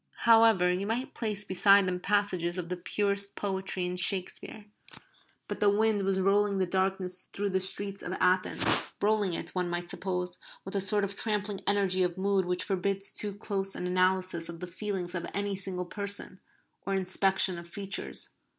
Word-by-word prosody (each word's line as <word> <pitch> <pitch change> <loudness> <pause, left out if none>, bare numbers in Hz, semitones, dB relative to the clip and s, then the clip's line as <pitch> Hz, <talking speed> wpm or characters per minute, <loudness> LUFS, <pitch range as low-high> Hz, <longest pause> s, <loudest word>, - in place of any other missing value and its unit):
However, 225 -6 +6
you 190 +3 -2
might 240 +4 -2
place 210 -3 -3
beside 195 0 +5
them 180 -1 -1
passages 185 -3 0
of 175 -1 -4
the 180 - -1
purest 200 +2 -1
poetry 190 -2 -2
in 180 0 -3
Shakespeare. 190 +3 -1 0.8
But - - -5
the 205 - +4
wind 210 0 +2
was 195 0 0
rolling 200 +1 +2
the 190 - +2
darkness 185 0 -2
through 200 0 -1
the 190 0 +1
streets 195 +1 0
of 175 - -5
Athens, 185 0 +1 0.4
rolling 205 -3 +1
it, - - -5
one 180 -1 -1
might 175 0 -3
suppose, 180 -2 -2 0.3
with 190 - -6
a 200 - +1
sort 205 +2 +2
of 200 0 -6
trampling 205 -2 -1
energy 195 -2 +2
of 180 -1 0
mood 195 -1 +1
which 180 0 0
forbids 195 0 0
too 205 -2 +1
close 195 -2 -2
an - - -4
analysis 185 -2 +1
of 170 -1 -8
the 180 - -4
feelings 185 -1 -4
of 170 -2 -3
any 200 0 -1
single 185 -1 -2
person, 200 0 -2 0.4
or 195 - -1
inspection 190 -1 +4
of 170 0 -11
features. 195 +2 -2
190 Hz, 180 wpm, -29 LUFS, 180-200 Hz, 0.8 s, However